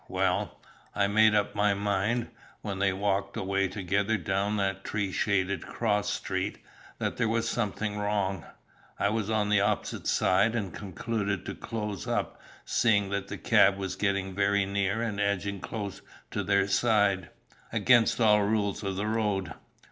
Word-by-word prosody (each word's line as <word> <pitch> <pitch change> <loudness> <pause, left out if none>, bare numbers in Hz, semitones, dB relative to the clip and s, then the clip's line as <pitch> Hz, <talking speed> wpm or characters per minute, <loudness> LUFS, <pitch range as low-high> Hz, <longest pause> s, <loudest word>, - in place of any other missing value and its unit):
Well, - - -1 0.4
I 100 - +3
made 110 +1 +4
up 105 0 +1
my 105 -1 +2
mind, 105 +4 0 0.3
when 100 -2 -4
they 100 -1 +3
walked 100 +1 -1
away 100 -1 0
together 100 +3 0
down 100 +3 -1
that 95 -1 -1
tree 105 -3 -2
shaded 100 -1 0
cross 105 -2 0
street, 95 +1 -2 0.4
that - - -2
there 115 - +1
was 115 0 0
something 105 -2 -2
wrong. 100 -4 -1 0.5
I - - +1
was 110 -1 -1
on 105 -2 +1
the 105 -1 +4
opposite 105 +1 -1
side, 100 +5 +3
and 100 -7 -3
concluded 100 0 -3
to - - -4
close 105 -4 -5
up, - - -2 0.2
seeing 100 -4 +2
that 100 0 -2
the - - -6
cab 95 0 +4
was 95 -1 -4
getting 100 -2 -1
very 100 +1 +2
near 100 +3 0
and 105 -3 -3
edging 100 0 -1
close 100 -1 -5 0.3
to - - -1
their 100 -1 +2
side, 100 -4 +2 0.4
against 120 -3 +4
all 105 -2 +5
rules 100 -1 0
of 100 -2 -3
the 100 +2 -2
road. 105 -6 -1
100 Hz, 160 wpm, -28 LUFS, 95-105 Hz, 0.5 s, all